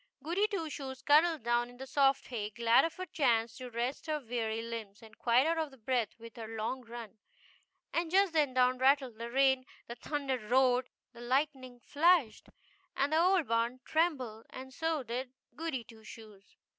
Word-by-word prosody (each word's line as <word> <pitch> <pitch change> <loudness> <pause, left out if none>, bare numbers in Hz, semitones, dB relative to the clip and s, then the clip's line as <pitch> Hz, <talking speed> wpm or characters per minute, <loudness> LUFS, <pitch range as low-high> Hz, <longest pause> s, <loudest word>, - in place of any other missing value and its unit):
Goody 360 +7 +1
Two 395 -7 -3
Shoes 265 -3 -7
cuddled 310 -1 +4
down 240 +1 +1
in 245 - -15
the 265 - -7
soft 275 0 +2
hay, 215 -5 -3
glad 230 +2 +4
of 330 - -5
a 370 - -4
chance 235 -8 +1
to 255 -1 -7
rest 240 +6 -3
her 305 -1 -1
weary 225 -3 -3
limbs, 225 -2 -7
and 220 0 -14
quite 245 +4 +3
out 330 0 +1
of 270 -8 -5
breath 245 -5 0
with 230 0 -13
her 225 -1 -6
long 225 +4 -3
run; 230 -2 -10 0.7
and 335 0 0
just 385 0 +3
then 290 -5 +1
down 255 0 +3
rattled 260 -3 +2
the 235 0 -5
rain, 265 +1 +3 0.2
the 235 - -5
thunder 275 0 -3
roared, 250 +2 +2 0.2
the 235 - -12
lightning 260 0 -1
flashed, 315 -5 +2 0.5
and 280 +3 +1
the 315 - +4
old 365 -3 +3
barn 230 +2 0
trembled, 280 -9 -1
and 260 0 -10
so 320 -1 -1
did 250 +2 -5 0.2
Goody 315 -5 -3
Two 225 -1 -16
Shoes. 215 -2 -14
255 Hz, 180 wpm, -32 LUFS, 235-295 Hz, 0.7 s, cuddled